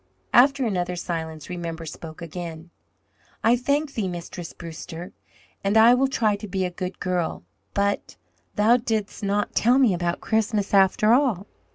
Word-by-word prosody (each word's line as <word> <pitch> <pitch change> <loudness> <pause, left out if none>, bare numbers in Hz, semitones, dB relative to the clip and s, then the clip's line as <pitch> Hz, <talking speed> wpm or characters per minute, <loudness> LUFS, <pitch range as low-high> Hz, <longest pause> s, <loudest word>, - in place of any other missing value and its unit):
After 270 +2 +5
another 180 -4 -1
silence 160 -3 -5
Remember 170 -2 -5
spoke 160 +1 -8
again: 170 0 -7 0.7
"I 230 +2 +5
thank 280 +4 0
thee, 215 -6 -1
Mistress 175 -1 -6
Brewster. 165 +1 -8 0.5
And 200 +2 +2
I 230 +2 +8
will 265 +2 +3
try 220 -6 +1
to 210 - -8
be 190 -1 -1
a 180 - -3
good 180 +1 -5
girl. 180 -2 -2 0.3
But 200 0 0 0.4
thou 220 +4 +5
didst 220 -4 -3
not 205 +1 0
tell 245 +3 +4
me 255 -7 +4
about 175 0 -1
Christmas 220 -2 0
after 200 +3 +5
all." 240 -8 +2
195 Hz, 155 wpm, -24 LUFS, 175-225 Hz, 0.7 s, I